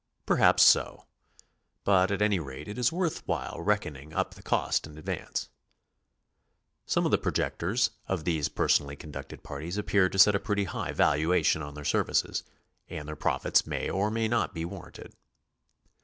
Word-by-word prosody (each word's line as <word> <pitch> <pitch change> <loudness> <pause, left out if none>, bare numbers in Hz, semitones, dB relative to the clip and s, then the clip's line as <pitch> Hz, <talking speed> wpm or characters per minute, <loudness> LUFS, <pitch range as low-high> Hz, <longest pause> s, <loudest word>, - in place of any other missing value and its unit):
Perhaps - - +5
so. - - +4 0.8
But 95 -1 +4
at 100 +1 0
any 105 -3 +2
rate 70 0 -8
it 105 +4 -6
is 120 - +3
worth 170 -1 -1
while 75 -9 -3
reckoning 75 +1 -2
up - - -1
the - - -14
cost - - 0
in 75 -1 -13
advance. 75 - -4 1.4
Some - - +1
of - - +1
the - - +3
projectors 100 +9 0 0.2
of 95 -4 -2
these 80 -3 0
personally 70 0 +1
conducted 70 -1 -9
parties 80 +7 -6
appear 100 -2 +2
to 95 - -5
set 105 +2 +7
a 100 - +1
pretty 105 -3 -1
high 90 - -4
val - - +3
uation 80 +1 +2
on 75 0 -8
their 75 -1 -8
services, - - +1 0.5
and 75 - -6
their 75 - -5
profits 75 - +1
may - - -2
or 100 +2 0
may 110 +1 0
not 115 -3 0
be 80 0 -3
warranted. 90 0 -10
90 Hz, 170 wpm, -28 LUFS, 75-100 Hz, 1.4 s, set